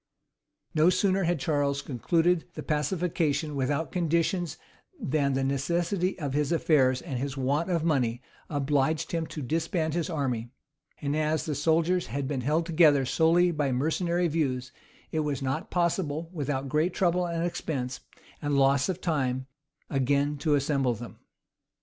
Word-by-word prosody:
No 160 +2 +5
sooner 190 0 +2
had 170 -1 +1
Charles 140 -1 0
concluded 165 +6 +1
the - - -5
pacification 155 -1 0
without 140 +2 -1
conditions 170 -1 0 0.4
than 140 -1 0
the 135 0 0
necessity 170 +8 0
of 145 -6 -3
his 145 +1 0
affairs 135 -6 +3
and 130 -3 -4
his 140 +1 -3
want 140 +6 0
of 170 -3 +1
money 125 -8 +1 0.3
obliged 145 +1 0
him 165 -2 -1
to 150 - -6
disband 160 +3 -1
his 170 0 -1
army; 130 -8 -2 0.5
and 145 +1 0
as 155 0 0
the 155 - -2
soldiers 165 +5 +1
had 135 +3 -3
been 135 -2 -2
held 155 +6 +1
together 155 -5 +4
solely 170 +6 +3
by 150 -4 0
mercenary 170 +6 +1
views, 130 -6 -1 0.4
it 160 - -1
was 145 -3 -1
not 135 0 -2
possible, 170 -2 -1
without 140 -4 -2
great 155 +6 +1
trouble, 180 -1 +2
and 170 0 -1
expense, 135 -7 -3 0.4
and 145 -1 0
loss 135 +1 +3
of 185 0 -3
time, 130 -6 0 0.4
again 140 +2 +1
to 145 +1 +1
assemble 135 -3 +1
them. 110 -2 -10
150 Hz, 150 wpm, -28 LUFS, 135-170 Hz, 0.5 s, No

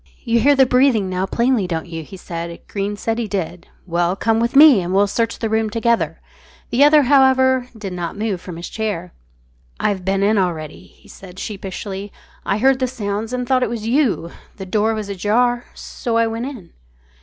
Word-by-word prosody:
"You 235 -1 +2
hear 285 +5 +4
the 265 -1 +5
breathing 250 -6 +2
now 185 +1 -1
plainly, 235 -3 +1
don't 165 -2 -3
you?" 165 -1 -6
he 190 +5 -11
said. 170 -1 -6
Greene 205 0 -3
said 225 +2 -2
he 230 - -2
did. 180 -3 -4 0.2
"Well, 175 0 0
come 225 +2 +1
with 235 +3 -1
me, 285 -7 +8
and 180 +2 -2
we'll 200 +1 +5
search 230 +3 -1
the 225 - -2
room 220 0 0
together." 230 +1 0 0.5
The 250 +4 +4
other, 295 0 +6
however, 260 -1 +4
did 200 -4 -6
not 175 +1 -5
move 205 -4 -2
from 180 -3 -8
his 170 - -6
chair. 200 -6 -4 0.7
"I've 195 -3 -1
been 195 +1 0
in 210 +1 +3
already," 160 -5 -3
he - - -23
said 185 -1 -13
sheepishly; 195 0 -6 0.4
"I 195 - +1
heard 265 +3 +3
the 255 - +1
sounds 220 -2 -4
and 250 0 -2
thought 255 0 +2
it 250 - 0
was 225 -2 -5
you. 235 - +1 0.3
The 190 - -7
door 215 +3 +1
was 215 -2 -4
ajar 230 +5 0
so 230 -2 -3
I 230 - +3
went 225 +2 -3
in." 240 -12 -10
215 Hz, 200 wpm, -19 LUFS, 190-240 Hz, 0.7 s, me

